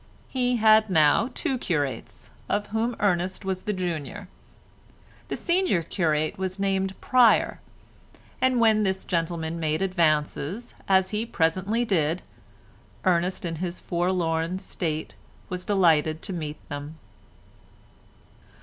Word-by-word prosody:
He 250 -1 +1
had 220 -1 +5
now 160 - +4
two 260 -2 -1
curates, 145 - -3 0.2
of 205 0 0
whom 230 +2 0
Ernest 185 0 0
was 190 -1 -2
the 210 - -2
junior; 180 0 -4 1.0
the - - -3
senior 350 - +1
curate 155 -2 0
was 190 0 -3
named 195 -1 -1
Pryer, 250 -3 +4 0.8
and 260 -1 +3
when 220 -2 +4
this 190 -2 -1
gentleman 165 -1 -2
made 155 +2 0
advances, 170 +3 0
as 190 -1 +3
he 210 +1 -1
presently 195 +4 0
did, 170 -4 0 0.8
Ernest 180 0 +1
in 165 -1 -3
his 175 +1 -4
forlorn 175 -1 0
state 165 -5 -4 0.4
was 180 0 -5
delighted 160 -6 +2
to 195 - -5
meet 155 -3 -4
them. 145 +2 -7
185 Hz, 120 wpm, -26 LUFS, 160-205 Hz, 1.0 s, had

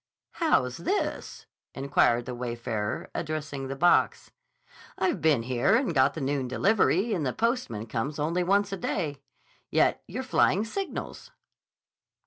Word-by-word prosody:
"How's 130 - +1
this?" 395 - -3 0.3
inquired 130 -3 +2
the 125 - -5
wayfarer, 120 -3 -4
addressing 145 -3 -4
the 135 - -4
box. 175 +6 +2 0.7
"I've 360 - 0
been 150 -7 +3
here 125 - +2
and 240 -7 +1
got 130 -3 +3
the 160 - -4
noon 135 -1 -1
delivery, 200 - +2
and 170 -6 -1
the 130 -3 -1
postman 230 - -1
comes 120 +6 -3
only 165 +4 0
once 200 +2 +2
a 195 - -3
day. 150 -6 -3 0.5
Yet - - +2
you're 250 +8 -4
flying 215 -5 +2
signals." 390 - -5
150 Hz, 135 wpm, -27 LUFS, 125-200 Hz, 0.7 s, been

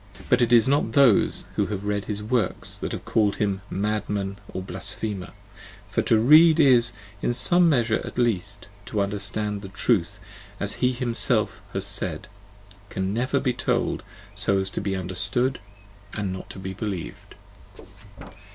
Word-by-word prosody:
But - - +4
it 120 -1 +2
is 115 -1 +6
not 135 -5 +1
those 135 -6 +4
who - - +1
have 100 -1 -5
read 105 -1 -1
his 105 -1 -4
works 110 -3 -1
that - - -4
have - - -6
called 105 -3 +1
him 100 -2 -1
madman 100 -1 -2
or 95 - -5
blasphemer: 95 +1 -4 0.6
for - - 0
to 115 - +3
read 155 +7 +6
is, 125 -5 +5 0.3
in 120 - 0
some 175 +7 +5
measure 120 -6 +1
at - - -8
least, 100 -5 -1 0.2
to 105 - -2
understand, 105 +1 -1
and 95 - -9
Truth, 100 -6 +1 0.4
as - - 0
he 125 - +3
himself 120 -2 0
has - - -1
said, - - -3 0.6
can 95 +1 -2
never 130 +5 0
be 130 -2 0
told - - -1 0.3
so 100 - +1
as 95 0 -1
to - - -4
be 100 -1 -2
understood 95 +8 0 0.6
and 100 -3 -2
not 95 0 -9
be 95 0 -4
believed. 100 -3 -6
105 Hz, 155 wpm, -24 LUFS, 95-120 Hz, 0.6 s, is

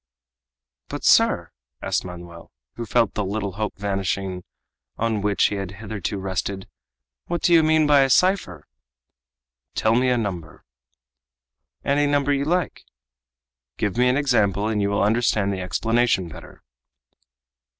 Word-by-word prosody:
"But, - - -7
sir," - - +4 0.3
asked - - -1
Manoel, 85 -1 -10 0.2
who 115 -1 -7
felt 110 +1 +2
the 105 - -2
little 100 +1 -3
hope 105 +2 -4
vanishing 95 -2 -3 0.5
on 110 -2 -1
which 100 0 +1
he 105 - -3
had 95 -1 -5
hitherto 105 -1 -5
rested, 95 0 -4 0.6
"what 175 0 -3
do 175 - +4
you 165 - +7
mean 155 0 +3
by 145 -1 +5
a 135 - +2
cipher?" 175 - +1 1.1
"Tell 110 - +2
me 125 +2 +2
a 125 - +2
number." 90 -8 -5 1.2
"Any 145 +1 +2
number 145 0 +1
you 140 0 -1
like." 175 +1 -1 0.9
"Give 105 - -1
me 125 +1 +3
an 130 - +2
example 110 -8 +1
and 110 -2 0
you 100 - +1
will 100 0 +1
understand 105 -2 +1
the 95 - -4
explanation 115 +1 +1
better." - - -13
105 Hz, 140 wpm, -23 LUFS, 95-130 Hz, 1.2 s, you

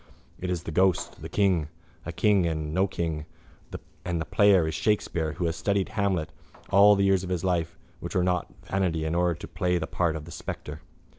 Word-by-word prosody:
It 90 - -4
is 90 -2 -2
the 80 - -5
ghost, 95 +2 +1
the 80 - -7
king, 90 -5 +2 0.4
a - - -2
king 100 -5 +3
and 80 -2 -3
no 95 +3 +2
king, 80 -5 -3 0.8
and 85 -2 -2
the 80 - -3
player 100 -6 +4
is 80 - -2
Shakespeare 80 -3 0
who 90 - -3
has 80 -1 0
studied 100 +3 0
Hamlet 100 -7 -1 0.4
all 100 +1 +7
the 100 - +1
years 95 -1 +3
of 90 - -5
his 90 -2 -2
life 85 -3 -1 0.2
which 85 - -6
were 90 - +3
not 90 -2 0
vanity 90 -5 -1
in 80 - -1
order 85 0 +2
to - - -9
play 90 -1 0
the 80 - -2
part 85 -1 0
of 75 -2 -6
the 85 - -11
spectre. 75 -2 -7
90 Hz, 210 wpm, -27 LUFS, 80-95 Hz, 0.8 s, all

